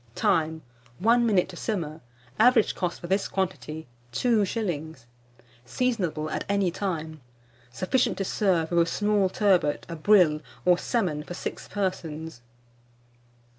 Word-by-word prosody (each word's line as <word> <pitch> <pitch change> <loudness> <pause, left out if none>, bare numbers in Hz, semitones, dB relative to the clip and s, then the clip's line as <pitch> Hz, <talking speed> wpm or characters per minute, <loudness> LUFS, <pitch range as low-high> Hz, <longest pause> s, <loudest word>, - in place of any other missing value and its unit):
Time. 160 -6 +1 0.3
1 235 +4 +3
minute 195 -5 +3
to 185 - -9
simmer. 165 -6 -3 0.4
Average 235 -1 +5
cost, 180 -2 -3
for - - -9
this 195 +3 0
quantity, 175 -5 -3 0.3
2s. 180 - -1 0.6
Seasonable 180 - -1
at - - -2
any 200 -3 +2
time. 160 -5 -4 0.5
Sufficient 185 - 0
to 195 - -1
serve 180 -5 +1
with 170 - +3
a 170 - +5
small 205 -2 +1
turbot, 185 -7 +2
a 170 - -6
brill, 165 -3 +4 0.2
or 180 -1 +5
salmon 180 -11 -1
for 175 +3 -8
6 - - -6
persons. 160 -8 -4
180 Hz, 130 wpm, -26 LUFS, 160-205 Hz, 0.6 s, Average